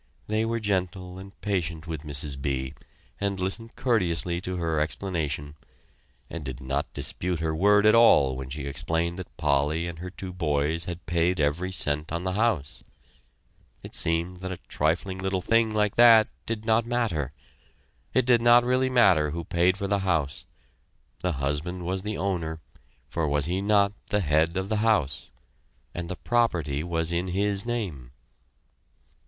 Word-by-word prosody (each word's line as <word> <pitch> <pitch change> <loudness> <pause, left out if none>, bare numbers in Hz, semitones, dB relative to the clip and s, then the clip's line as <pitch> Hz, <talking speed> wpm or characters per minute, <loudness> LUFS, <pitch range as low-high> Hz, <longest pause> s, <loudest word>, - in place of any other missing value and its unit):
They 110 +1 0
were 115 +1 -1
very - - -5
gentle 95 -2 -2
and 95 +1 -12
patient 85 -5 -2
with 80 -3 -5
Mrs. 70 -2 -3
B. 65 -1 -2 0.5
and 100 -1 -1
listened 110 +5 -4
courteously 90 -9 +1
to 95 0 -4
her 80 -3 0
explanation, 75 -2 -2 0.7
and 85 - -6
did 65 -2 -6
not 70 +2 -2
dispute 90 -2 -2
her 80 -1 -1
word 105 +4 +4
at 110 - +7
all 70 - +6
when 65 0 -6
she 70 +2 -5
explained 80 +5 -2
that 95 - -9
Polly 75 +4 +1
and 85 -1 -6
her 90 +1 -6
two 95 0 -8
boys 80 -1 0
had 85 0 -6
paid 85 +1 +1
every 80 +6 0
cent 75 -4 0
on 85 +1 -2
the 95 - -1
house. 100 -9 0 1.0
It - - -10
seemed 85 +2 -1
that 95 +1 -5
a 90 - -4
trifling 90 +5 -1
little 95 0 -1
thing 115 +4 +2
like 105 -1 0
that 115 -2 +7 0.2
did 110 -1 -3
not 110 0 +3
matter. 110 - -1 0.8
It 130 - +2
did 120 -2 +4
not 120 +1 +6
really 130 +1 +2
matter 95 -12 +4
who 85 +3 -4
paid 90 +3 +2
for 100 - -3
the 100 +1 +1
house; 85 -7 -1 0.7
the 90 -1 -1
husband 75 +6 -3
was 95 +2 -2
the 105 +2 -4
owner, 85 -5 -2 0.5
for 80 +2 -1
was 75 -1 +2
he 90 +3 -1
not 100 0 +3 0.2
the 105 - +1
head 80 +1 +2
of 95 0 -2
the 110 - 0
house? 105 -11 +1 0.6
and 85 0 -5
the 95 - -3
property 85 -12 0
was 85 -1 -1
in 85 +2 -1
his 100 +3 +1
name. 95 - -3
90 Hz, 170 wpm, -26 LUFS, 80-100 Hz, 1.0 s, at